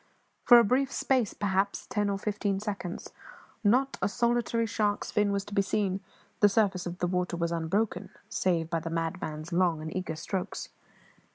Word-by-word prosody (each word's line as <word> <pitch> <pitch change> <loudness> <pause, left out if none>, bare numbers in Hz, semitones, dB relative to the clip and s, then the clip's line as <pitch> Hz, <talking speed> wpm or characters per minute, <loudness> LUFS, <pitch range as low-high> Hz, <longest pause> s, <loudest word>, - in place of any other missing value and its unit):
For 240 - +9
a 235 - +7
brief 260 +5 +2
space, 255 -6 +1
perhaps 200 0 0
ten 205 -1 0
or 200 - 0
fifteen 200 -1 -1
seconds, 200 -4 -5 0.5
not 255 +6 +2
a - - +2
solitary 235 +1 +1
shark's 205 -1 -1
fin 210 -1 +2
was 200 0 -1
to 205 - -10
be 200 - +3
seen; 195 -1 0 0.4
the 205 - +6
surface 195 -4 +1
of 175 0 -5
the 180 - 0
water 180 -1 -1
was 170 0 -1
unbroken, 180 +4 -1 0.2
save 170 -3 0
by 165 0 -1
the 165 - -5
madman's 165 -1 -3
long 175 -2 +2
and 155 +1 -6
eager 180 -3 -3
strokes. 185 +4 -4
195 Hz, 175 wpm, -29 LUFS, 175-210 Hz, 0.5 s, For